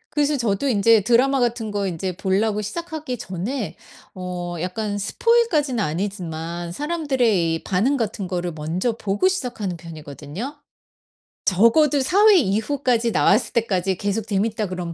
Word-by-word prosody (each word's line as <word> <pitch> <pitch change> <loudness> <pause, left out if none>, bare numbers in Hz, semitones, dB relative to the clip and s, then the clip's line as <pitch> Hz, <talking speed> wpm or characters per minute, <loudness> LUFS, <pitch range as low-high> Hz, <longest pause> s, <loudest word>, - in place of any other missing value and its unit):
그래서 295 0 +2
저도 235 -1 0
인제 225 -2 +4
드라마 250 +6 +3
같은 235 -3 -1
거 200 -1 -1
인제 180 0 -4
볼라고 205 +3 +1
시작하기 310 - -5
전에 205 +6 -4 0.4
어 180 -1 -5
약간 205 +3 -3
스포일 465 - +2
까지는 285 - 0
아니지만 170 -1 -4
사람들의 260 - +1
이 - - -6
반응 220 +10 +1
같은 210 -5 -2
거를 175 -1 -2
먼저 165 +8 -2
보고 205 - +1
시작하는 240 - -3
편이거든요. 160 - -8 0.9
적어도 265 - +4
4 390 +10 +4
회 420 -3 +8
이후까지 235 - +1
나왔을 210 +3 +3
때까지 190 -5 0
계속 205 +2 -2
재밌다 210 +1 0
그럼 180 -2 -5
210 Hz, 330 characters per minute, -22 LUFS, 180-260 Hz, 0.9 s, 회